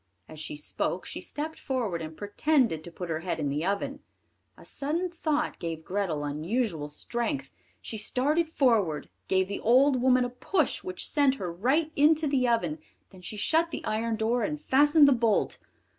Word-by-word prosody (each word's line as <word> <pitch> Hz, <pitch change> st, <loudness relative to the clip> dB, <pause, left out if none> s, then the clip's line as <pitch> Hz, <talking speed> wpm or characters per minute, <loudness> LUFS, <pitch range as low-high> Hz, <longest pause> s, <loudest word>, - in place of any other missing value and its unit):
As 155 Hz, -, -11 dB
she 150 Hz, -, -5 dB
spoke 150 Hz, -, -2 dB
she -, -, -6 dB
stepped 310 Hz, +2 st, -5 dB
forward 230 Hz, -, -2 dB
and 155 Hz, 0 st, -7 dB
pretended 210 Hz, -, +1 dB
to 170 Hz, -, -9 dB
put 175 Hz, 0 st, -6 dB
her 160 Hz, -, -1 dB
head 175 Hz, 0 st, -3 dB
in 145 Hz, -2 st, -1 dB
the 145 Hz, +3 st, -1 dB
oven. 275 Hz, +10 st, -2 dB, 0.6 s
A -, -, -15 dB
sudden 330 Hz, +6 st, -2 dB
thought 310 Hz, -3 st, -1 dB
gave 165 Hz, -1 st, -5 dB
Grethel 180 Hz, -6 st, -1 dB
unusual 160 Hz, -, -2 dB
strength; 150 Hz, -, -3 dB, 0.3 s
she 220 Hz, -, -4 dB
started 300 Hz, +9 st, +1 dB
forward, 220 Hz, -, +1 dB, 0.2 s
gave 190 Hz, 0 st, +2 dB
the 200 Hz, -, -4 dB
old 255 Hz, +2 st, +4 dB
woman 255 Hz, -1 st, +4 dB
a -, -, -3 dB
push 305 Hz, +5 st, 0 dB
which 185 Hz, 0 st, -4 dB
sent 285 Hz, -3 st, +3 dB
her 180 Hz, -9 st, -4 dB
right 275 Hz, -, +1 dB
into 310 Hz, +2 st, +4 dB
the 270 Hz, -3 st, +2 dB
oven, 175 Hz, -10 st, 0 dB, 0.3 s
then 185 Hz, -, -14 dB
she 210 Hz, +4 st, -6 dB
shut 325 Hz, +9 st, +2 dB
the -, -, -6 dB
iron 225 Hz, +1 st, -1 dB
door 230 Hz, +2 st, 0 dB
and 300 Hz, +3 st, -2 dB
fastened 290 Hz, +2 st, +5 dB
the -, -, +6 dB
bolt. 230 Hz, -3 st, +1 dB
230 Hz, 180 wpm, -28 LUFS, 175-285 Hz, 0.6 s, the